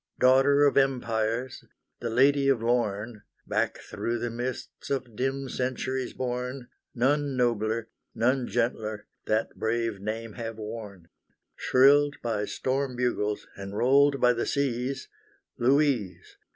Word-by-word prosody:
Daughter 135 +3 +5
of 140 - +3
Empires, 125 -2 0 0.4
the 120 - -3
Lady 135 +4 +4
of 130 -5 +2
Lorne, 115 -2 -1 0.2
Back - - 0
through 120 +1 -4
the 120 0 -3
mists 125 +2 -5
of 130 -5 -3
dim 135 +3 -2
centuries 130 0 -2
borne, 125 0 -4 0.3
None 140 +2 +1
nobler, 115 -2 0 0.3
none 125 +2 +1
gentler 110 -2 -2 0.2
that 110 +1 0
brave 115 -2 -1
name 110 +2 -4
have 115 -1 -6
worn; 105 -5 -8 0.5
Shrilled 145 +3 +4
by 110 -3 -1
storm 130 +3 -2
bugles, 105 -4 -1
and 100 +1 -7
rolled 140 +3 +4
by 125 0 +5
the 120 - -2
seas, 135 -1 -1 0.5
Louise! 130 -6 +1
125 Hz, 125 wpm, -27 LUFS, 115-135 Hz, 0.5 s, Daughter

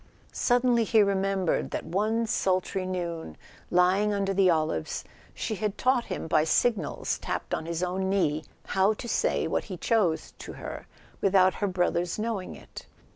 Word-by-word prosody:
Suddenly 245 -1 +3
he 220 -1 +4
remembered 195 -2 0
that - - -4
one 215 +7 0
sultry 185 -2 0
noon, 170 - -4 0.3
lying 190 +4 +3
under 195 -1 0
the 190 -1 +4
olives, 155 - 0 0.3
she - - -3
had 210 0 -2
taught 255 -2 +2
him, - - -4
by 155 -1 +3
signals 220 +7 0
tapped - - -4
on 160 - -2
his 170 +1 -2
own 190 +1 -1
knee, 155 -6 +1 0.2
how 195 +3 +2
to 235 - -7
say - - +1
what - - -1
he 185 -4 -6
chose 185 -6 +1
to - - -8
her - - -8 0.3
with¬ 195 0 +2
out 185 0 +6
her 205 - -1
brothers' 175 -2 0
knowing 215 -4 -3
it. - - -12
190 Hz, 165 wpm, -27 LUFS, 180-210 Hz, 0.3 s, out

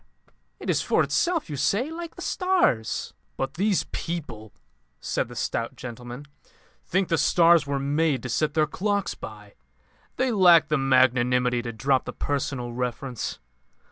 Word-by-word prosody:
'It - - -8
is - - +2
for - - +2
itself,' 345 -2 0
you 150 - -5
say. 200 - 0
Like 335 0 -7
the - - -8
stars." 360 - 0 0.2
"But 135 0 -2
these 200 +2 +1
people," 125 -11 -5 0.5
said - - -2
the 120 - -11
stout 115 0 -2
gentleman, 120 +3 -8 0.6
"think 190 +1 0
the 165 - +1
stars 165 -1 +4
were 140 0 -1
made 140 -1 0
to 125 - -5
set 150 +5 0
their 155 -1 +4
clocks 200 +5 -1
by. 105 -2 -10 0.6
They 255 0 +1
lack 175 -7 +6
the 155 - +2
magnanimity 125 -2 +3
to 120 -1 -5
drop 130 +4 +1
the - - -6
personal 135 -4 -3
reference. 125 0 -4
140 Hz, 150 wpm, -25 LUFS, 125-175 Hz, 0.6 s, lack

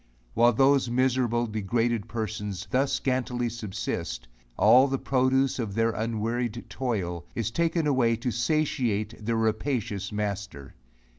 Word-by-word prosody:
While 120 +2 +4
those 135 +1 +3
miserable 120 -1 +1
degraded 115 +1 -1
persons 105 -4 -4
thus 135 +2 +2
scantily 125 -2 -1
subsist, 105 - -4 0.3
all 125 +6 +6
the 135 0 -1
produce 130 0 +1
of 105 -4 -3
their 115 0 +2
unwearied 115 +1 -2
toil, 90 -9 -3
is 115 -1 -2
taken 165 +3 +1
away 125 -5 +3
to 120 +2 -3
satiate 120 -5 -1
their 115 +2 0
rapacious 110 -2 -1
master. 100 -9 -4
115 Hz, 125 wpm, -27 LUFS, 105-130 Hz, 0.3 s, all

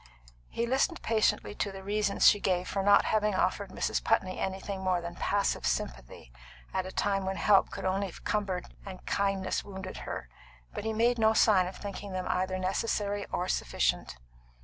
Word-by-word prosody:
He 235 - -1
listened 270 +8 0
patiently 220 -2 +1
to 205 -1 -2
the 195 0 -9
reasons 205 0 +1
she 205 - +6
gave 180 -2 0
for 195 - -1
not 200 +1 +5
having 210 -2 +1
offered 190 +1 0
Mrs. - - -1
Putney 190 -5 +1
anything 190 0 -3
more 185 -1 +1
than 170 0 -6
passive 200 +3 0
sympathy - - -3 0.4
at 185 0 -1
a - - -7
time 195 0 0
when 190 0 -2
help 200 0 +4
could - - -6
only 195 +1 0
have 175 - -12
cumbered 195 -4 -1 0.2
and 190 -2 -9
kindness 195 -2 0
wounded 190 -1 -7
her, - - -6 0.5
but - - -5
he 220 - 0
made 235 +2 +2
no 220 0 +4
sign 200 -5 +4
of 185 - -7
thinking 200 -1 -7
them 185 -1 -3
either 185 +1 0
necessary 200 +2 -1
or 180 - -1
sufficient. 60 - 0
195 Hz, 180 wpm, -30 LUFS, 185-205 Hz, 0.5 s, she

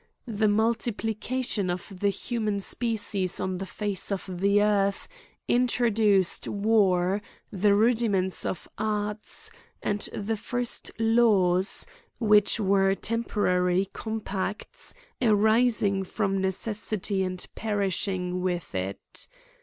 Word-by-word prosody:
The 220 -3 0
multiplication 225 0 0
of 180 +2 -5
the 200 - +2
hu 235 +4 -3
man 210 -2 0
species 205 -4 -1
on 185 -1 -2
the 195 - -5
face 205 +3 -3
of 195 0 -3
the 200 +2 +3
earth 200 -1 +1 0.4
introduced 225 -6 +2
war, 200 -2 +2 0.3
the 200 +1 +3
rudiments 215 -4 +2
of 170 - -4
arts, 210 0 -3 0.3
and 205 0 -1
the 215 +2 -3
first 245 +3 -2
laws, 215 -5 +3 0.3
which 210 -1 +4
were 195 -1 +3
temporary 195 -5 0
compacts, 210 -2 -4 0.3
arising 215 -2 +4
from 195 0 -1
necessity, 200 0 0
and 185 -1 -2
perishing 190 -3 -1
with 180 -2 -2
it. 95 +1 -4
205 Hz, 105 wpm, -27 LUFS, 190-220 Hz, 0.4 s, which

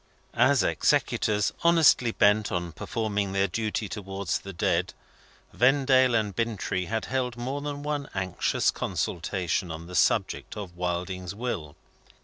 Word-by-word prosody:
As - - +4
executors 105 -1 +1
honestly 165 -8 +5
bent 105 0 +3
on 85 -1 -2
performing 105 -1 -2
their 100 0 +2
duty 110 +2 -2
towards 95 -1 -3
the 100 - -8
dead, 85 - 0 0.6
Vendale 130 -1 +4
and 105 -3 0
Bintrey 105 -5 -1
had 110 +2 -2
held 125 -2 -2
more 130 +4 -3
than 145 0 -5
one 145 -1 -3
anxious 95 -2 0
consultation 90 0 -2
on 80 +1 -6
the 90 - -10
subject 90 - +1
of 95 -4 -7
Wilding's 90 +1 -3
will. 100 -11 -4
105 Hz, 130 wpm, -27 LUFS, 90-125 Hz, 0.6 s, honestly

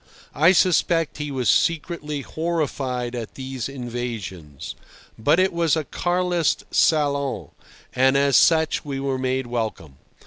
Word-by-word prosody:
I 155 +6 +5
suspect 170 -4 +2
he 150 0 -3
was 130 -3 -2
secretly 155 -3 0
horrified 135 -6 -2
at 120 -3 -6
these 130 -2 -5
invasions. 115 - -6 0.4
But 145 +10 +2
it 190 0 +2
was 170 -2 +2
a 160 - -1
Carlist 175 +1 0
salon, 140 -4 +1 0.4
and 130 +1 +3
as 140 -1 +3
such 160 -1 +4
we 140 -2 -4
were 135 -1 -2
made 130 0 -1
welcome. 110 - -4
140 Hz, 130 wpm, -23 LUFS, 125-160 Hz, 0.4 s, I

